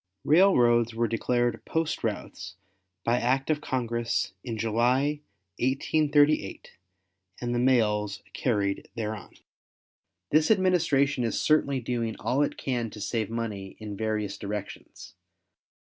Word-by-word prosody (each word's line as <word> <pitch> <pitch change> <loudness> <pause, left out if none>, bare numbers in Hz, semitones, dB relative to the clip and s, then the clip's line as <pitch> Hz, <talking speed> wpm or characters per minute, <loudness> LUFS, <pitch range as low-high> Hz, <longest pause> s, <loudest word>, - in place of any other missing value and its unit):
Railroads 120 - +4
were 115 0 +1
declared 120 +1 0
post 160 -3 -2
routes 100 -4 -4 0.5
by 120 +1 +2
act 135 +4 +1
of 150 -1 -1
Congress 120 -4 -1
in 115 -3 -4
July, 125 +7 +1 0.4
1838, 145 -2 +1 0.7
and 120 0 -2
the 120 - 0
mails 105 -5 +1
carried 100 -5 -1
thereon. 110 -4 -5 1.0
This 155 +1 +4
administration 165 - +2
is 115 - -1
certainly 140 -3 +2
doing 115 -2 -2
all 135 +3 0
it 145 - 0
can 120 -4 -2
to 105 - -11
save 110 +1 -2
money 105 -4 -4
in 105 -2 -7
various 105 -1 -2
directions. 105 0 -7
120 Hz, 120 wpm, -27 LUFS, 110-140 Hz, 1.0 s, Railroads